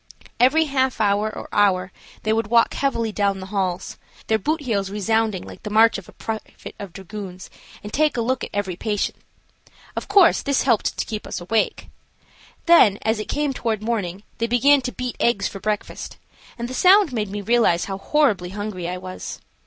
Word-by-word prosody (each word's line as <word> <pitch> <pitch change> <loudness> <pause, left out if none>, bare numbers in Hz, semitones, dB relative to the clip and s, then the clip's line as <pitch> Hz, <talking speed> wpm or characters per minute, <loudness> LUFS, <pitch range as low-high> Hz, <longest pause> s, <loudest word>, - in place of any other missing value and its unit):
Every 295 +6 +5
half 265 -4 0
hour 205 0 +2
or - - -8
hour 190 -3 +2 0.3
they 215 - +1
would 225 -1 0
walk 230 +1 +4
heavily 230 -5 0
down 200 -2 0
the 190 - -7
halls, 185 -2 -2 0.3
their 220 0 +1
boot 310 - -1
heels 205 -8 -1
resounding 210 -1 0
like - - -11
the 210 - -6
march 220 0 +4
of 190 - -15
a - - -12
private 220 -1 -7
of 200 -3 -7
dragoons, 190 0 -8 0.3
and 210 - -8
take 305 -2 +2
a - - +1
look 255 +3 -1
at - - -4
every 200 -3 -2
patient. 205 +2 -2 0.8
Of - - -4
course 395 -4 +5
this 280 -2 +1
helped 235 -5 +1
to - - -1
keep 215 -1 -5
us - - -4
awake. 215 +5 -1 0.8
Then 280 - +6
as 220 0 +1
it 215 - -6
came 295 -2 0
toward 220 -4 -2
morning, 205 -4 -2 0.2
they 230 - +1
began 270 +4 +4
to 250 - -3
beat 250 -1 -5
eggs 205 -4 +2
for 195 - -8
breakfast, 210 +1 -4 0.4
and 235 0 -4
the 255 - -7
sound 370 0 +5
made 210 -4 -2
me 205 +1 -4
realize 220 -6 +2
how 195 -1 -5
horribly 215 -11 +1
hungry 195 -3 -5
I 180 - -3
was. 185 0 -7
215 Hz, 190 wpm, -22 LUFS, 195-245 Hz, 0.8 s, Then